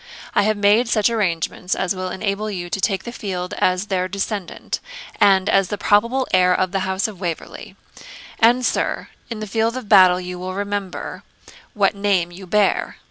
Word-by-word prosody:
I - - +4
have 215 +1 +1
made 210 +4 +3
such 220 0 +2
arrangements 180 -4 -1
as 190 -1 -1
will 185 0 -4
enable 200 +2 -2
you 175 -4 -5
to 195 - -2
take 190 -1 0
the 235 - -6
field 185 -6 -5
as 185 +2 +1
their 185 -3 -1
descendant, 200 -1 -4 0.4
and 195 -1 +4
as 195 -1 +3
the 205 - -4
probable 235 +7 +2
heir 180 -1 +4
of 185 -1 0
the 195 - 0
house 190 +1 -1
of 205 -5 -10
Waverley; 170 -3 -6 0.6
and, 245 +2 +4
sir, - - -1 0.2
in 225 -2 -5
the - - -3
field 225 +3 0
of 255 - -7
battle 185 -3 +6
you 180 0 -6
will 185 +1 -5
remember 200 -2 -4 0.5
what 200 -1 +3
name 200 -4 0
you 185 +2 -11
bear. 205 +2 +1
195 Hz, 185 wpm, -21 LUFS, 185-210 Hz, 0.6 s, battle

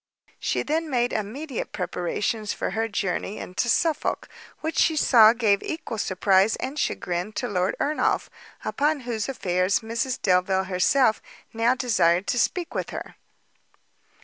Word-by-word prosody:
She - - -1
then 315 +2 -1
made 245 -2 0
immediate 245 +7 -4
preparations 195 +4 -2
for - - -3
her 225 +1 -1
journey 205 -1 -2
into 210 +6 -3
Suffolk, 320 +5 0 0.3
which 320 +1 -2
she 320 - +3
saw 230 -7 +7
gave 220 -4 +2
equal 310 -9 -5
surprize 195 +2 +3
and 270 +4 -5
chagrin 180 +4 -2
to 245 - -2
Lord 185 -3 0
Ernolf, 305 +1 0 0.4
upon 295 0 0
whose 235 -1 -3
affairs 185 -6 0
Mrs 230 +3 -2
Delvile 190 0 +2
herself 215 +6 +2 0.3
now 230 +2 +2
desired 200 -8 +2
to 245 - +1
speak 350 +7 -1
with - - -3
her. - - -7
225 Hz, 140 wpm, -25 LUFS, 190-260 Hz, 0.4 s, saw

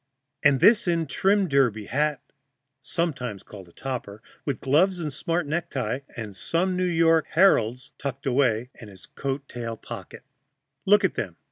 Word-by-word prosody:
And 140 -2 +4
this 210 -3 +5
in 170 -2 +1
trim 195 +6 +2
derby 125 -8 +2
hat 150 +4 0 0.6
(sometimes 130 - -3
a 100 -2 -10
topper), 110 +2 -6 0.2
with 140 -4 -2
gloves 175 +7 +2
and 155 -4 -3
smart 165 +4 -1
necktie, 135 -6 -2 0.2
and 110 -5 -6
some 175 - 0
New 185 0 0
York 165 -2 +3
"Heralds" 125 - +3
tucked 135 -1 -5
away 125 -3 +1
in 110 -4 -12
a 100 - -13 0.2
coat 135 0 -3
tail 115 -2 -5
pocket. - - -9 0.6
Look 205 +1 +6
at 190 - +2
them! 90 -6 -4
140 Hz, 150 wpm, -25 LUFS, 120-170 Hz, 0.6 s, Look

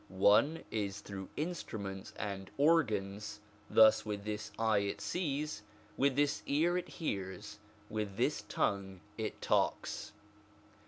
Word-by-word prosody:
One 100 +11 +5
way 165 - -10
is 100 -2 -2
through 95 -1 -7
instruments 110 - -4
and 95 -1 -4
organs: 105 -10 +2 0.3
thus 110 0 +7
with 105 -2 -4
this 105 0 -4
eye 110 -2 +3
it 100 0 -2
sees, 150 - -2 0.3
with 140 -1 +3
this 145 0 +2
ear 165 +5 +3
it 180 - -2
hears, 95 - -4 0.3
with 105 -2 -3
this 135 +5 +1
tongue 95 -2 -1
it - - -4
talks. - - 0
105 Hz, 125 wpm, -34 LUFS, 100-145 Hz, 0.3 s, thus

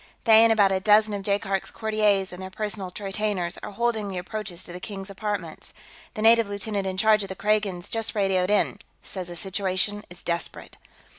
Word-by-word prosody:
They, 220 -1 +8
and 230 - +5
about 205 -3 +4
a 190 - +1
dozen 210 +1 +4
of 200 - -3
Jaikark's 195 -1 -1
courtiers 210 -4 +1
and 180 - -8
their 190 - -6
personal 200 -1 -4
retainers, 195 -3 -2
are - - -7
holding 220 0 -1
the 190 - -5
approaches 190 -1 -5
to 175 - -8
the 180 - -7
King's 195 0 -7
apartments. 195 -5 -5 0.4
The 215 - -3
native 230 -1 +5
lieutenant 200 0 -3
in 185 0 -3
charge 215 +1 +4
of 195 - -5
the 190 - -5
Kragans 205 -3 0
just 225 0 -2
radioed 190 -2 +1
in; 210 - +1 0.2
says 185 -2 -4
the 175 - -7
situation 190 +2 0
is 175 0 -11
desperate." 170 0 -3
200 Hz, 195 wpm, -25 LUFS, 185-215 Hz, 0.4 s, They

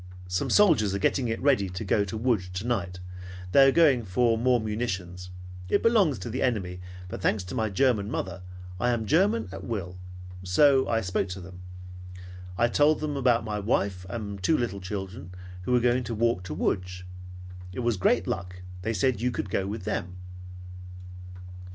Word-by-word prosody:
Some 90 0 -1
soldiers 130 - +4
are - - +1
getting 125 +5 +1
it 115 0 -2
ready 130 -9 +3
to 90 +4 -6
go 100 +2 +2
to 100 +3 -5
Lodz 110 -6 0
tonight. 95 -1 -3 0.5
They 135 +4 +7
are - - +6
going 140 -6 +4
for 115 +4 +2
more 125 +2 +2
munitions. 95 -5 -4 0.4
It - - +2
belongs 205 - +3
to 95 +4 -6
the 130 - -3
enemy, 95 -8 -1 0.3
but 90 - -7
thanks 105 0 +1
to 90 - -8
my 110 -1 0
German 105 -1 +1
mother, 95 -5 -4 0.4
I 120 - +1
am 120 -2 0
German 155 - +2
at - - -8
will; 90 -6 -5 0.4
so 130 +9 +4
I 115 -1 +1
spoke 95 -1 -1
to 90 +1 -6
them. 90 0 -11 1.0
I 120 - +3
told 145 +5 +3
them 150 -1 -3
about 125 -4 +2
my 105 -1 -3
wife 100 -3 -1
and 100 -3 -5
two 155 - +3
little 100 -5 -3
children 95 -1 -6 0.3
who - - -2
were 125 - +5
going 125 +1 +2
to 115 - -4
walk 115 -3 +1
to 75 -4 -5
Lodz. 90 +1 -2 0.7
It 95 - -5
was 120 -2 +1
great 90 - +2
luck. 90 +1 -5 0.2
They 110 +4 -2
said 115 +2 +1
you 125 - +1
could 100 -5 -4
go 95 - 0
with 105 0 -5
them. 90 0 -3
110 Hz, 180 wpm, -27 LUFS, 95-125 Hz, 1.0 s, They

